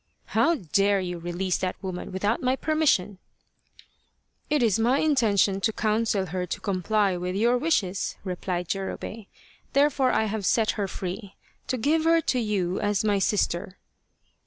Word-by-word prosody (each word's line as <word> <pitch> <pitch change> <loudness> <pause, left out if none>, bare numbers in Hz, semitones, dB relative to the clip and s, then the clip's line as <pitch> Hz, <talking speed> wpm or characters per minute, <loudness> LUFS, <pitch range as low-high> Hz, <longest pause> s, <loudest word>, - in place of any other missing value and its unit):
" - - -43
How 335 +1 +4
dare 200 - +1
you 180 -2 -4
release 175 +2 -2
that 185 -1 -2
woman 185 -1 -5
without 205 +5 -1
my 255 +1 +2
permission? 270 - +1 0.4
" - - -27
" - - -45
It 295 -4 +2
is 220 -3 +2
my 245 +4 +3
intention 215 -10 +2
to 220 - +2
counsel 215 -2 0
her 180 +1 -3
to 190 - -4
comply 195 +1 0
with 180 +1 -3
your 235 +4 +3
wishes," 205 - 0
replied 180 -2 -3
Jurobei, 195 +2 -4 0.2
" - - -32
therefore 275 -2 +3
have 220 0 0
I - - -6
set 215 +3 +2
her 205 -2 -2
free 190 +2 -6 0.3
to 255 - -1
give 310 +7 +1
her 330 0 +5
to 255 -5 0
you 195 -5 -1
as 205 -1 0
my 205 -2 +2
sister." 190 -2 0
205 Hz, 170 wpm, -26 LUFS, 185-235 Hz, 0.4 s, her